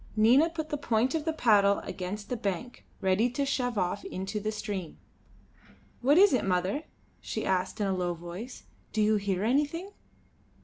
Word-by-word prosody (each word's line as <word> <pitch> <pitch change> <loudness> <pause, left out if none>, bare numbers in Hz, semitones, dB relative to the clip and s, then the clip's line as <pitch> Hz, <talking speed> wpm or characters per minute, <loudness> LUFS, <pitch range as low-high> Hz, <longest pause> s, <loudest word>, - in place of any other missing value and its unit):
Nina 245 +9 +5
put 315 -2 -5
the 295 - -1
point 240 0 +1
of 315 -2 -1
the 320 - +1
paddle 205 -9 +4
against 200 +3 -6
the 250 - -1
bank, 215 +2 -4
ready 195 +5 +2
to 275 +4 -1
shove 245 -4 -1
off 185 +1 -1
into 190 +3 -4
the 215 +1 -2
stream. 205 -5 -5 1.0
"What 280 +5 +4
is 400 -1 +7
it, 255 - +2
mother?" 190 - 0 0.3
she - - -4
asked, 185 +3 0
in 205 - +1
a 195 - +1
low 180 -1 -1
voice. 175 +9 -8 0.3
"Do 220 - +1
you 215 0 +3
hear 195 -2 -1
anything?" 295 - 0
215 Hz, 175 wpm, -29 LUFS, 190-265 Hz, 1.0 s, is